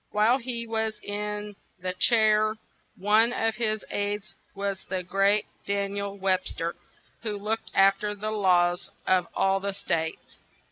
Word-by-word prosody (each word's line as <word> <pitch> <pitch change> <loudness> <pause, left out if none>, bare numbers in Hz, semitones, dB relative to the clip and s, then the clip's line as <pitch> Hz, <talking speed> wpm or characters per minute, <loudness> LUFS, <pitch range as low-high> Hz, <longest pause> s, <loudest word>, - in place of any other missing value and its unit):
While 220 +5 +3
he 235 -2 -3
was 220 -1 -1
in 210 0 -4 0.2
the 185 0 -3
chair 215 +1 +4 0.4
one 215 +4 +4
of 225 -2 +1
his 215 -2 0
aids 205 0 -2 0.2
was 200 -1 -3
the 185 0 -2
great 195 +3 +2 0.2
Dan 200 0 0
iel 200 0 -4
Web 190 -1 +1
ster, 170 +1 -3 0.5
who 215 -3 -2
looked 215 +2 -2
af 195 0 +5
ter 210 0 -2
the 215 +1 -3
laws 180 -4 +2 0.2
of 185 -2 +3
all 195 0 +2
the 200 0 -3
states. 160 -4 -3
205 Hz, 150 wpm, -27 LUFS, 195-215 Hz, 0.5 s, af